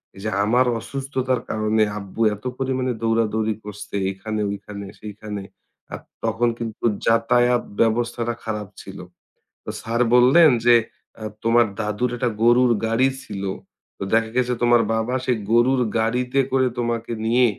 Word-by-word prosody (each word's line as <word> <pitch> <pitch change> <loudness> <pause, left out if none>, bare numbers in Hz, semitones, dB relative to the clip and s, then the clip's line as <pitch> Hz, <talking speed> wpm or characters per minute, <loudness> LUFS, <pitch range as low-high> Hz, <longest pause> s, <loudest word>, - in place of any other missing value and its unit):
এই 95 - -11
যে 110 - -1
আমার 125 +4 +3
অসুস্থতার 130 +1 -2
কারণে 110 0 +1 0.2
আব্বু 100 +3 -7
এত 105 - -18
পরিমাণে 130 -1 -1
দৌড়াদৌড়ি 110 -1 +1
করছে 105 -1 -8
এইখানে 105 +2 -4
ঐখানে 100 0 -8
সেইখানে। 105 -1 -7 0.5
আর - - -5 0.2
তখন 115 +2 +1
কিন্তু 115 0 -5 0.2
যাতায়াত 120 +2 +3 0.2
ব্যবস্থাটা 120 +1 0
খারাপ 105 -2 -4 0.2
ছিল। 95 0 -10 0.7
তো - - -6
স্যার 115 +2 -1
বললেন 140 +7 +7 0.2
যে, 120 - +7 0.4
"অ্যা 110 - -8 0.2
তোমার 115 +1 +4
দাদুর 105 +3 -1
একটা 125 -1 0
গরুর 120 +1 +5 0.2
গাড়ি 125 +4 +3
ছিল। 100 -2 -6 0.5
তো - - -5
দেখা 115 0 +3
গেছে 125 0 +1
তোমার 120 -1 +5
বাবা 110 +3 -1
সেই 125 -3 +1
গরুর 125 +2 +4 0.2
গাড়িতে 125 +4 0
করে 130 -1 +3
তোমাকে 115 -1 -2
নিয়ে 120 +2 +4
115 Hz, 145 wpm, -22 LUFS, 110-125 Hz, 0.7 s, বললেন